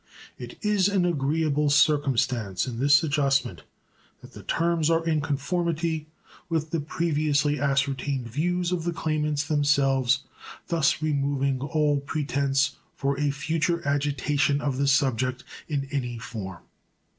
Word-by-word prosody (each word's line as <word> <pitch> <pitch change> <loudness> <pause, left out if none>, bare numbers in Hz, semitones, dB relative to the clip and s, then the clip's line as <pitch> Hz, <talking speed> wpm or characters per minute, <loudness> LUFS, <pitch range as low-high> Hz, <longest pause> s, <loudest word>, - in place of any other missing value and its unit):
It - - -8
is 205 -3 +3
an 195 -3 +1
agreeable 150 -1 +1
circumstance 135 - +2
in 120 -3 -5
this 145 +4 +5
adjustment 140 -3 0 0.6
that - - -14
the - - -10
terms 165 -1 0
are 165 0 +2
in 155 -2 +1
conformity 160 +2 -1 0.4
with 160 -2 -1
the 165 - 0
previously 150 -2 0
ascertained 135 -2 0
views 175 +8 -1
of 175 -3 -1
the 175 0 -1
claimants 150 -2 -1
themselves, 135 -3 +2 0.5
thus 160 -2 +1
removing 140 -3 0
all 150 0 +1
pretense 140 -2 0 0.2
for 140 0 -1
a 145 -1 +1
future 160 +3 -1
agitation 145 0 +1
of 140 -3 -2
the 140 - +1
subject 130 -2 +1 0.3
in 140 -2 -2
any 125 -4 -2
form. 110 -7 -7
145 Hz, 130 wpm, -26 LUFS, 135-160 Hz, 0.6 s, this